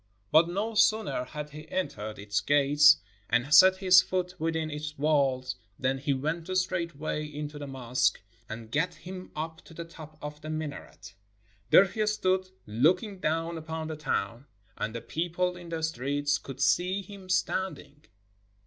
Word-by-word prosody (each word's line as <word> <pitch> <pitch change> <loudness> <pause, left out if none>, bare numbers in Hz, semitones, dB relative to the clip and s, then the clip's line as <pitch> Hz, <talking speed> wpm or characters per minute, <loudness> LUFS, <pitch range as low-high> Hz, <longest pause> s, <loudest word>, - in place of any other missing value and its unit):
But 160 +2 +6
no 205 +6 -2
sooner 215 - +2
had 150 +1 -7
he 150 +1 -10
entered 125 - -3
its 105 0 -1
gates 145 +1 +6 0.3
and 120 +5 +1
set 185 +4 +9
his 185 -2 +7
foot 180 -1 -2
within 160 -1 -1
its 150 0 -6
walls 135 -3 +1 0.2
than 135 +1 0
he 140 +1 -1
went 155 +5 -2
straightway 170 -5 -2
into 150 0 -6
the 145 - -6
mosque, 130 -2 0 0.3
and 110 0 -8
gat 170 +6 0
him 185 0 -9
up 160 +1 -5
to 165 - -14
the 170 - -6
top 155 -2 -12
of 150 0 -8
the 155 - -7
mina 155 -2 -4
ret. - - -14 0.6
There 195 - +8
he 215 +3 -2
stood 185 -3 +1 0.2
looking 180 - +1
down 165 +1 -1
upon 160 0 -5
the 155 - -4
town, 130 -4 -3 0.3
and 110 +2 -4
the 115 - -4
people 175 +2 -1
in 175 -1 -10
the 165 -1 -4
streets 145 -1 0
could 135 -1 -8
see 180 +8 +2
him 195 -2 -12
standing. 155 -5 -2
155 Hz, 165 wpm, -28 LUFS, 145-180 Hz, 0.6 s, set